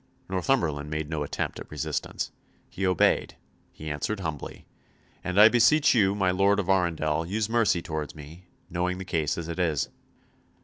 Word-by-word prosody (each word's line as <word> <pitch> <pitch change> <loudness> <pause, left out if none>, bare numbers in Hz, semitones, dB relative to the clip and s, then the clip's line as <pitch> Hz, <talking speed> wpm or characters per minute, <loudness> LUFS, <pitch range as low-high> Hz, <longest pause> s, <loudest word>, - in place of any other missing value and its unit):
Northumberland 85 - 0
made 75 0 -4
no 80 -2 -2
attempt 75 - -3
at - - -9
resistance. 75 -3 -3 0.4
He 95 0 -1
obeyed, 90 -2 +2 0.4
he 75 0 -7
answered 95 +8 -3
humbly; 80 -5 -6 0.6
"and 90 +2 0
I 105 - +10
beseech 120 +6 +5
you, 100 -5 +3
my 95 -2 +2
Lord 100 +2 +3
of 95 -2 -2
Arundel, 80 -4 +1
use 100 +5 -1
mercy 110 -6 +2
towards 75 -1 -4
me, 80 +4 -12 0.2
knowing 90 +1 -1
the 95 - -6
case 80 -5 -1
as 85 -1 -4
it 85 +2 -5
is." 80 -6 0
90 Hz, 165 wpm, -27 LUFS, 80-95 Hz, 0.6 s, I